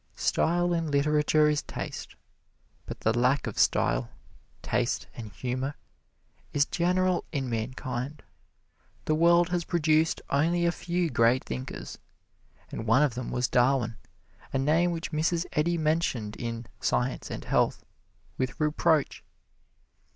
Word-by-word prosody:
Style 175 +1 +1
in 165 -2 -1
literature 150 +1 +3
is 150 -1 +1
taste. - - -7 0.7
But - - -7
the 110 +1 +2
lack 125 +4 +2
of - - -4
style, - - +2 0.5
taste - - 0
and 110 -3 -8
humor 130 +7 -3 0.8
is 145 0 +3
general 180 +1 +1
in 135 -5 -2
mankind. 125 +4 -4 0.8
The 155 - +1
world 170 +2 +4
has 175 -1 0
produced 160 -1 +2
only 170 +5 +2
a 170 - +3
few 175 -1 -2
great 120 +2 +3
thinkers, 65 0 -6 0.7
and 110 - -5
one 130 +7 +5
of 145 -5 +1
them 125 0 -5
was 125 0 0
Darwin, 125 -2 +2 0.6
a - - 0
name 155 +6 +3
which 170 -1 -4
Mrs. 165 +2 0
Eddy 170 +3 +1
mentioned 155 -9 0
in 115 0 -5
"Science 125 +1 -1
and - - -6
Health" - - +1 0.5
with 130 +4 -2
reproach. 155 0 +1
150 Hz, 130 wpm, -28 LUFS, 125-165 Hz, 0.8 s, one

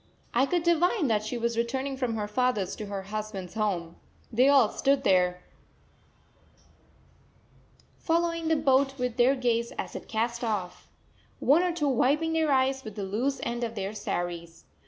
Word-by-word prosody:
I 260 +3 +3
could 350 +1 0
divine 345 - +2
that 215 -1 +1
she 220 +3 -4
was 235 0 -1
returning 265 +3 -2
from 250 -4 -2
her 210 -1 -2
father's 215 -3 0
to 210 - -6
her 200 -1 -5
husband's 200 -3 -6
home. 185 -6 -2 0.4
They 255 +5 +5
all 270 -6 +5
stood 275 0 +1
there, 180 -1 +2 2.6
following 335 0 0
the 320 - +3
boat 270 -2 +2
with 250 -1 -2
their 255 +3 +4
gaze 235 -2 0
as - - -5
it - - -7
cast 235 +2 -2
off, 205 -6 -3 0.5
one 295 +5 +4
or 360 -1 +1
two 325 -4 -1
wiping 290 +5 +2
their 320 -2 +1
eyes 265 0 +2
with 215 -3 -8
the 205 - -4
loose 245 +8 -1
end 240 0 -3
of 230 -1 -3
their 195 0 -3
saris. 170 -4 -5
240 Hz, 165 wpm, -28 LUFS, 210-275 Hz, 2.6 s, They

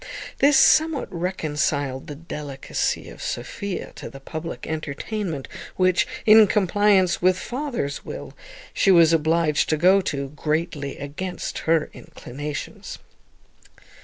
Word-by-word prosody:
This 280 0 +5
somewhat 300 -5 +4
reconciled 150 -6 -2
the 145 - -6
delicacy 145 -3 -4
of - - -11
Sophia 200 -2 -4
to - - -7
the 135 - -11
public 155 +4 -6
entertainment 160 +1 -4 0.3
which, 185 -3 +2 0.2
in 215 0 +8
compliance 200 -2 +3
with 185 +1 +3
her - - -7
father's 245 - -3
will, - - -8 0.4
she - - +2
was 170 -3 +6
obliged 160 -1 +2
to 155 - +2
go 185 +5 +5
to, 140 -6 -3
greatly 150 -1 -3
against 165 +6 -5
her 160 0 +2
own - - -11
inclinations. 145 +3 -7
165 Hz, 125 wpm, -23 LUFS, 145-190 Hz, 0.4 s, in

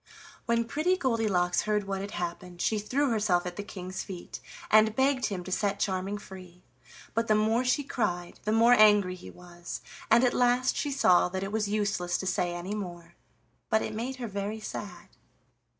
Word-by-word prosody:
When 235 0 +2
Pretty 310 +10 +1
Goldilocks 215 - +1
heard 210 -1 0
what 195 -1 -3
had 200 - -5
happened 175 -1 -5
she 215 +3 +1
threw 265 +6 0
herself 205 -6 +1
at 175 0 -5
the 205 - -4
King's 185 -2 -6
feet 180 -3 -8 0.3
and 215 0 +5
begged 265 -1 +2
him 190 -4 -4
to 185 - -8
set 200 +1 0
Charming 190 +1 -1
free, 185 -3 -12 0.5
but 230 +1 0
the 215 - +4
more 220 +3 +2
she 255 +3 +1
cried, 180 -10 -3
the 215 - -1
more 230 +2 +6
angry 210 -5 +5
he 185 - -10
was, 175 -1 -9 0.3
and 235 - +6
at 245 - +3
last 250 +1 +2
she 290 - -1
saw 185 -10 +4
that 190 +1 -3
it 195 - -4
was 210 -1 -1
useless 200 -4 0
to - - -5
say 175 -1 0
any 175 +4 -5
more; 175 -4 -7 0.6
but 220 - +2
it - - -4
made 240 +5 -3
her 250 -2 -5
very 200 +1 -4
sad. 205 -4 -7
205 Hz, 190 wpm, -28 LUFS, 180-230 Hz, 0.6 s, more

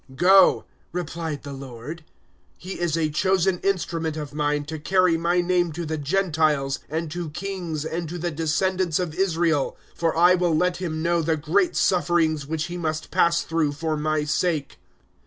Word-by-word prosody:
009:015 130 - -14
"Go," 190 +1 +6 0.3
replied 165 -3 -4
the 140 - -7
Lord; 135 +4 -8 0.5
"he 185 +2 -7
is 170 -2 0
a 155 -2 0
chosen 185 +3 +1
instrument 165 -5 -1
of 150 -2 -6
Mine 150 0 0
to 160 +1 -6
carry 185 +1 +3
My 170 +2 +1
name 175 -1 +1
to 170 +2 -4
the 160 0 -3
Gentiles 155 -4 +1
and 160 +1 -3
to 175 -1 -4
kings 175 -3 -4
and 165 0 -3
to 175 - -5
the 175 0 -2
descendants 165 +2 0
of 180 -4 -2
Israel. 165 -5 +1 0.2
009:016 - - -30
For 165 -1 +1
I 175 +2 +6
will 175 -3 +2
let 180 +1 +1
him 160 -3 -3
know 170 0 +2
the 160 0 0
great 170 +5 +1
sufferings 165 -5 +2
which 160 0 -2
he 175 +2 -5
must 155 -2 -3
pass 170 0 +3
through 160 -3 0
for 155 +1 -2
My 155 0 0
sake." 150 -1 -1
165 Hz, 180 wpm, -24 LUFS, 155-175 Hz, 0.5 s, Go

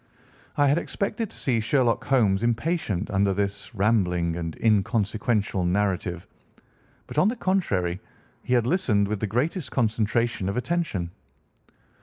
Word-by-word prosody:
I 145 - +4
had 145 +4 +3
expected 210 +4 -3
to - - -9
see 125 -4 +1
Sherlock 120 0 +1
Holmes 110 -8 +3
impatient 120 - -1
under 100 0 +2
this 100 +4 -3
rambling 90 -5 +1
and 85 -2 -5
inconsequential 110 -1 +1
narrative, 90 -2 -1 0.8
but, - - -2
on 180 - +4
the 230 - 0
contrary, 100 - 0 0.4
he 125 - 0
had 120 -2 +2
listened 120 - +2
with 105 0 -2
the 110 - -1
greatest 135 - -1
concentration 115 -3 0
of 100 - -3
attention. 125 - -2
110 Hz, 135 wpm, -25 LUFS, 95-130 Hz, 0.8 s, I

